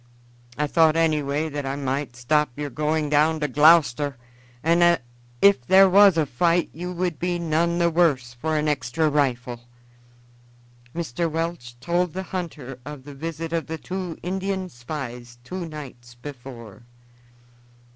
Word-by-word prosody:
I 150 - +1
thought 160 +1 +3
anyway 155 -2 +1
that 145 -2 -4
I 135 0 -3
might 135 -1 -3
stop 150 +5 +1
your 145 -1 -4
going 150 +2 0
down 155 +2 +2
to 150 - +1
Gloucester, 145 -2 +4 0.5
and 170 +2 +3
that 175 -6 +4 0.4
if 200 -10 +6
there 195 +1 +7
was 195 -1 +6
a 160 - +3
fight 165 +6 +1
you 180 +2 -5
would 180 -3 -2
be 175 0 -1
none 170 +1 0
the 170 -1 +2
worse 145 -8 +2
for 155 +6 -2
an 150 0 0
extra 150 +1 0
rifle." 125 -4 -1 1.3
Mr. 170 0 -2
Welch 160 -7 -4
told 175 +5 0
the 190 +1 -4
hunter 155 -9 -6
of 145 -1 -9
the 145 +1 -10
visit 165 +3 -5
of 165 -1 -1
the 160 0 -4
two 180 0 -5
Indian 190 +1 -2
spies 120 -2 -7
two 175 +6 -5
nights 125 -6 -10
before. 120 -4 -10
155 Hz, 150 wpm, -24 LUFS, 135-170 Hz, 1.3 s, there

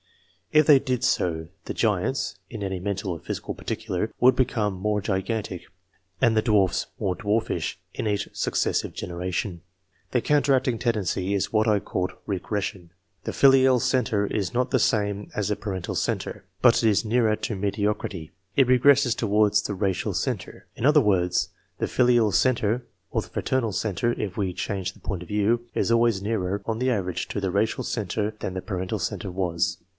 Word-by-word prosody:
If 155 0 +5
they 140 -2 +7
did 130 -3 -2
so, 80 -2 0 0.2
the - - -4
giants - - 0
(in - - -7
any 95 -1 -2
mental 100 +1 -3
or 85 - -4
physical - - -5
par - - -13
ticular) 110 -2 -2
would 125 +1 +6
become 115 -6 +1
more 105 +3 -1
gigantic, 100 -1 -2 0.6
and 115 +2 +3
the 110 - +4
dwarfs 105 -5 +2
more 95 -2 0
Iwarfish, 110 +2 -1 0.2
in - - -3
each 100 -1 0
successive - - 0
generation. 90 0 -4 0.5
The 125 - +1
counteract 140 -1 +2
ig 120 -3 0
tendency 100 -4 0
is 100 - -1
what 110 +1 +3
I 105 -2 +4
called 90 -1 -3
"regression." 100 -2 -3 0.4
The - - -2
filial 130 -1 +5
mtre 110 -5 +1
is 100 -4 -1
not 125 +1 +1
the - - +3
same 105 -4 0
as 105 - 0
the 105 - 0
parental 95 -4 -4
centre, - - -2 0.2
but 120 -1 +5
it 110 - +5
is 105 +2 +2
nearer 110 -1 +2
mediocrity; 100 -4 -2 0.2
it 135 -3 +5
regresses 130 0 +5
towards 105 -1 +3
the 100 - -4
racial 95 -1 -1
centre. - - -3
In - - -7
ler 150 +3 +6
words, 90 -7 +2 0.3
the - - -1
filial 120 -4 +3
centre 120 -1 +2 0.3
(or - - 0
the - - -12
fraternal 125 -4 -1
centre, 110 +3 0
if 95 -3 -3
we 95 -3 -1
change 95 +1 -3
the - - -19
point 95 -4 -4
of 90 - -10
view) 110 +3 +1
is - - +1
always 115 -4 +3
nearer, 100 -2 -1
on 115 -1 -2
the 130 +1 +1
average, 95 -7 -1
to - - -2
the 95 -2 -1
racial 105 +4 0
centre 105 0 -2
than 95 - -4
the 95 - -3
parental 95 -2 -3
centre 95 - -3
was. 90 -2 -1
105 Hz, 180 wpm, -25 LUFS, 95-115 Hz, 0.6 s, they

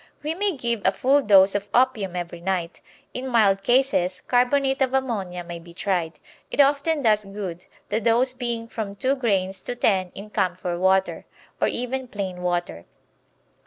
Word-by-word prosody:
We 305 +2 -1
may 385 -2 -1
give 235 -3 -2
a 190 - +4
full 270 +7 +3
dose 195 -4 +6
of 205 0 -3
opium 235 -7 +2
every 175 -1 -5
night. 180 -2 -3 0.3
In 255 +1 -4
mild 210 -6 +3
cases 240 -8 +2
carbonate 265 +2 +1
of 265 0 +2
ammonia 200 -9 -2
may 170 0 -7
be 170 0 -15
tried; 175 -5 -1 0.3
it - - -6
often 285 +2 +3
does 215 -2 +3
good, 195 -3 -7 0.2
the 215 +2 0
dose 235 +4 +2
being 235 -3 -4
from 215 -3 -5
two 260 +5 +1
grains 195 -8 -1
to 245 - -5
ten 190 -6 +1
in 210 +2 -9
camphor 180 -2 -1
water, 190 +1 +1 0.3
or - - +4
even 255 +2 -3
plain 190 -5 -5
water. 175 - -2
205 Hz, 165 wpm, -24 LUFS, 185-255 Hz, 0.3 s, dose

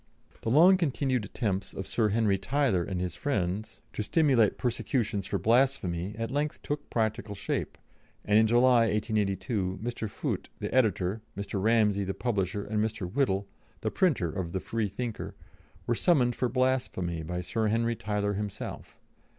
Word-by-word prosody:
The 115 - -2
long 170 +9 +7
continued 135 - 0
attempts 100 -3 -2
of 95 - -4
Sir 110 +1 +1
Henry 105 -2 +2
Tyler 125 -7 +1
and 90 0 -3
his 90 -1 -2
friends 105 -6 -2
to - - -3
stimulate 130 -3 +3
persecutions 115 -5 -1
for 100 - -1
blasphemy 105 -4 +1
at 115 +1 -3
length 145 +2 -2
took 145 0 -4
practical 110 -2 -1
shape, 100 - -3 0.5
and 105 +1 +5
in 110 - +4
July, 120 0 +5
1882, 100 -2 -1
Mr. 115 0 -4
Foote, - - -3
the - - -4
editor, 110 -5 +2 0.2
Mr. 100 -1 -3
Ramsey, 105 -2 +3
the 95 0 -3
publisher, 100 -4 -1
and 105 +1 0
Mr. 110 -4 -2
Whittle, 100 -8 +1 0.3
the - - -1
printer 135 - +2
of 85 -1 -4
the 95 - 0
Freethinker, 110 +2 -3 0.5
were 120 - +1
summoned 125 -3 +3
for 125 - 0
blasphemy 125 -10 0
by 90 +3 -3
Sir 110 +5 -1
Henry 115 +2 +1
Tyler 105 -2 -1
himself. 100 0 -6
110 Hz, 155 wpm, -29 LUFS, 95-120 Hz, 0.5 s, long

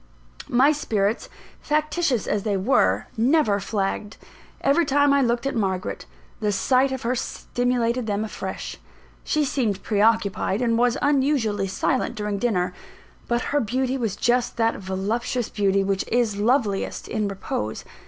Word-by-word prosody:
My 260 +5 +5
spirits, 220 -7 -1 0.3
factitious 300 -4 0
as 205 - 0
they 205 -1 0
were, 210 +9 +2
never 235 -3 +3
flagged. 205 +1 -3 0.4
Every 280 +5 +3
time 285 -1 +3
I 280 - +4
looked 240 0 0
at 275 - 0
Margaret, 190 -4 -2 0.3
the 210 -1 0
sight 255 +7 +2
of 265 - -4
her 240 +2 +1
stimulated 245 -1 -1
them 205 +1 -1
afresh. 215 - -6 0.5
She 305 -1 +1
seemed 230 -8 -1
pre 205 -2 0
occupied, 215 -2 +2
and 235 -2 +1
was 240 0 +2
unusually 265 -8 +1
silent 255 +6 -1
during 210 -1 -2
dinner; 185 -6 0 0.5
but 240 0 +1
her 290 - +4
beauty 255 +2 -1
was 225 -6 -2
just 245 +3 +1
that 225 0 +2
voluptuous 210 +6 -2
beauty 195 -1 +1
which 195 0 0
is 235 -3 +1
loveliest 210 -2 0
in 215 -2 -1
repose. 110 - -4
230 Hz, 145 wpm, -24 LUFS, 200-260 Hz, 0.5 s, My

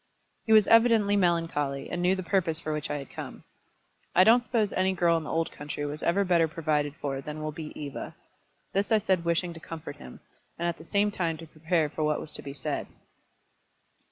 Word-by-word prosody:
He - - +1
was 215 -2 +7
evidently 225 -3 +5
melancholy, 165 -7 0
and 175 - -2
knew 180 +2 +3
the 185 - -4
purpose 175 -4 0
for 155 -2 -3
which 150 -1 -3
I 145 - -1
had 140 -2 -8
come. - - -8 0.7
"I 185 - +8
don't 230 +4 +6
suppose 225 -4 0
any 190 0 +2
girl 170 -2 +3
in 165 -1 -2
the - - -5
old 165 0 0
country 145 0 -5
was 145 +1 -5
ever 195 +4 +2
better 170 -3 +3
provided 150 -2 -1
for 135 -3 -3
than 150 +2 -6
will 155 - -2
be 155 0 -7
Eva." 145 -2 -6 0.6
This 200 +3 0
I 220 - +6
said 190 -5 +1
wishing 170 +1 0
to 165 - -10
comfort 160 0 -8
him, 65 -1 -11 0.4
and 170 - -1
at 170 - -3
the 160 - -11
same 205 +4 +2
time 165 -5 -1
to 165 - -9
prepare 160 +1 0
for 155 +1 -4
what 150 0 +1
was 155 - -8
to - - -5
be 140 - -7
said. 135 - -3
165 Hz, 215 wpm, -28 LUFS, 150-190 Hz, 0.7 s, I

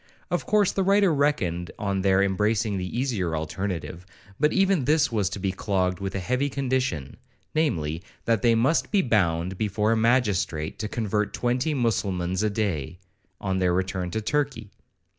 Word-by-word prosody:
Of - - -1
course 210 -3 +3
the 195 - -1
writer 195 -2 +4
reckoned 95 - 0
on 100 -2 -1
their 95 0 +3
embracing 105 +1 +1
the 90 +6 -3
easier 100 -11 -1
alternative, 85 +2 -4 0.4
but 150 +2 +3
even 195 -7 +2
this 150 -2 +3
was 105 -5 +1
to - - -5
be 95 0 -1
clogged 95 -1 -1
with 95 -1 -4
a - - 0
heavy 125 +9 0
condition,—namely, 125 - -2 0.2
that 115 -3 +2
they 115 +1 +4
must 130 +9 +2
be 200 -3 +2
bound 90 -5 +1
before 105 +1 +1
a - - +3
magistrate 105 -9 +1
to 105 - -2
convert 105 -1 -1
twenty 125 +5 0
mussulmans 95 -7 0
a 110 - +2
day, 95 -8 -2 0.4
on 95 -1 -1
their 90 -1 +2
return 95 -1 -1
to 110 +5 -2
Turkey. 125 -4 -2
105 Hz, 160 wpm, -25 LUFS, 90-125 Hz, 0.4 s, writer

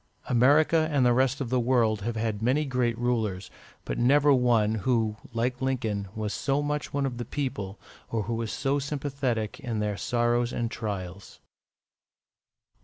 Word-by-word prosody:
America 150 +6 +4
and 140 -4 +3
the 120 - +5
rest 130 +2 +2
of 125 -3 -3
the 130 - +3
world 115 -4 +2
have 115 +3 -3
had 110 -2 -2
many 130 +6 +2
great 125 -4 0
rulers, 110 -6 -1 0.3
but - - -3
never 140 +4 +5
one 120 -4 +3
who, 110 -2 +1 0.2
like 125 +2 -1
Lincoln, 115 -7 -1
was 110 -1 -3
so 140 +1 0
much 150 0 -2
one 140 -1 0
of 125 -3 -4
the - - -2
people, 110 -7 -4 0.3
or 110 -2 -1
who 115 +4 -3
was 115 -1 -2
so 140 0 0
sympathetic 135 -6 -2
in 115 -3 -3
their 105 -1 -1
sorrows 120 +1 +1
and 115 -1 -2
trials. 100 -4 -6
120 Hz, 165 wpm, -27 LUFS, 110-135 Hz, 0.3 s, the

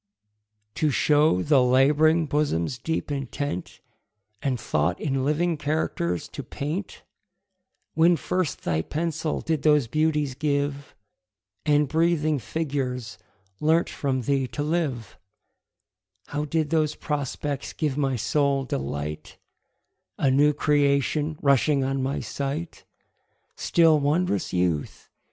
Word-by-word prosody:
TO 155 +7 +1
show 145 -8 +3
the 145 -3 +4
lab'ring 150 +6 +4
bosom's 135 - -1
deep 160 +3 -3
intent, 135 -7 -4 0.6
And 130 -3 -1
thought 85 -5 0
in 135 -3 -1
living 160 +4 +1
characters 145 - -1
to - - -6
paint, 160 +8 -5 0.9
When 170 +2 +5
first 180 -4 -2
thy 80 -2 0
pencil 160 - -2
did 160 -2 -1
those 150 -3 +4
beauties 150 +1 0
give, 140 0 -2 0.7
And 150 0 +4
breathing 155 -1 +1
figures 125 -7 -3 0.4
learnt 160 +2 +2
from 130 -2 -1
thee 135 +1 0
to 145 - -4
live, 145 -9 -2 1.1
How 150 +1 -2
did 155 0 -1
those 155 -2 +1
prospects 145 -1 -3
give 150 -4 -2
my 135 -2 0
soul 140 +3 +1
delight, 70 - -4 0.8
A 135 - +2
new 145 +3 +4
creation 145 +1 +1
rushing 140 0 +3
on 135 0 -1
my 135 +2 -2
sight? 140 +8 -5 0.7
Still, 165 -3 +4
wond'rous 145 - 0
youth! 90 -4 -1
145 Hz, 115 wpm, -25 LUFS, 130-155 Hz, 1.1 s, When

